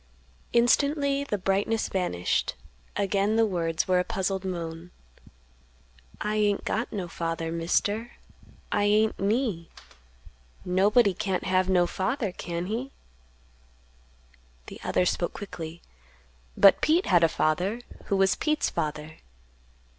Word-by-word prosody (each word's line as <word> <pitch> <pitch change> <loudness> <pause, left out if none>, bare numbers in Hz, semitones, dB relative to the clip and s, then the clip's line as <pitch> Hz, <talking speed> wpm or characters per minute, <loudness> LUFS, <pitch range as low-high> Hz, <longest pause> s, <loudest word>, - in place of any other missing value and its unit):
Instantly 280 +4 +2
the 215 -7 -2
brightness 200 +4 0
vanished; 135 - -1 0.4
again 200 +2 +1
the 225 0 +4
words 165 -5 -1
were 185 -1 +3
a - - +2
puzzled 190 -2 -2
moan; 170 -2 -5 1.3
"I 210 0 -1
ain't 205 -1 +1
got 225 +3 -2
no 190 -4 -4
father, 165 -1 -3
Mister; 205 +7 -1 0.6
I 205 0 +2
ain't 215 +1 +2
me; 205 -4 -1 1.0
nobody 200 +4 +3
can't 190 0 -2
have 185 0 +1
no 180 -2 +4
father, 205 +5 -2
can 170 -1 -4
he?" 235 +7 -4 1.7
The - - -10
other 180 - +1
spoke 175 -1 -1
quickly; 170 -4 -8 0.7
"But 195 -2 +7
Pete 335 +4 +3
had 175 -3 +4
a 165 - +5
father; 180 +9 0 0.2
who 200 - 0
was 195 0 +4
Pete's 305 -1 0
father?" 155 0 -4
195 Hz, 120 wpm, -27 LUFS, 175-220 Hz, 1.7 s, But